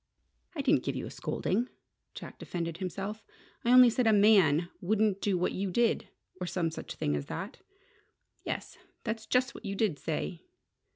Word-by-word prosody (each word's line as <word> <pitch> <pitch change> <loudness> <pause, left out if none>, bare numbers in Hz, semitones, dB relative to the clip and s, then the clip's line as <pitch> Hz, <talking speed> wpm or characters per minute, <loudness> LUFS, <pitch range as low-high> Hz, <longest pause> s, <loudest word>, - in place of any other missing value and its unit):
"I 290 - -1
didn't 290 +3 +3
give - - -2
you - - -3
a - - -7
scolding," 235 +6 -1 0.5
Jack - - -9
defended 170 -2 -4
himself. 195 +4 -4 0.4
"I 235 - +2
only 250 -1 +9
said 245 0 +1
a - - +6
man 190 -6 +5
wouldn't 205 +1 +1
do 200 -3 +1
what 180 - +1
you 195 0 -2
did 235 +5 +1 0.3
or 180 - -3
some 170 -2 -1
such - - -7
thing 75 - 0
as 70 -1 -4
that." 205 +7 -6 0.8
"Yes. - - -5 0.2
That's 220 0 -4
just 250 0 +2
what - - -11
you 200 -2 -3
did 195 -8 0
say." 165 +2 -3
200 Hz, 175 wpm, -30 LUFS, 175-225 Hz, 0.8 s, only